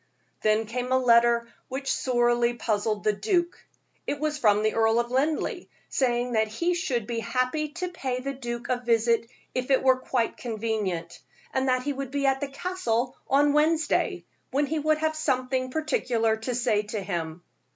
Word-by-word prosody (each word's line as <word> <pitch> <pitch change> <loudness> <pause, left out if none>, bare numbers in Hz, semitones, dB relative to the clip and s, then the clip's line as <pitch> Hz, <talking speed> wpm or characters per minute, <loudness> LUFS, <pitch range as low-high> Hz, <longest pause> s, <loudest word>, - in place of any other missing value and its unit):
Then 215 +1 +2
came 250 +3 -4
a 260 - +5
letter 235 -1 +4 0.2
which 270 +1 -2
sorely 240 -1 +2
puzzled 215 -2 -1
the 215 - +3
duke. 345 - -1 0.4
It 285 - -2
was 300 0 -1
from 210 -4 +4
the 215 - +2
Earl 225 0 +3
of 240 0 -2
Linleigh, 290 +4 0 0.2
saying 245 -1 +1
that 220 -2 +2
he 335 +12 0
should 255 -10 -1
be 230 +1 -3
happy 255 +7 -1
to 360 +2 -3
pay 265 -8 -3
the 275 +2 -4
duke 240 -3 -5
a 250 -1 +1
visit 230 0 +2 0.2
if 255 +1 -2
it 265 -1 +3
were 260 -1 +4
quite 245 -2 -1
convenient, 210 -7 -3 0.3
and 265 0 +1
that 255 0 +2
he 290 +1 -1
would 275 -1 -5
be 280 +1 -1
at 270 0 +2
the 285 - -1
Castle 270 -6 -2
on 285 +1 +4
Wednesday, 310 +1 +1 0.2
when 285 +2 +1
he 310 +2 -1
would 310 +1 +2
have 315 0 0
something 255 -3 0
particular 255 -7 0
to 225 +3 -4
say 215 -3 +2
to 210 +1 -5
him. 175 -3 -4
250 Hz, 180 wpm, -26 LUFS, 225-280 Hz, 0.4 s, a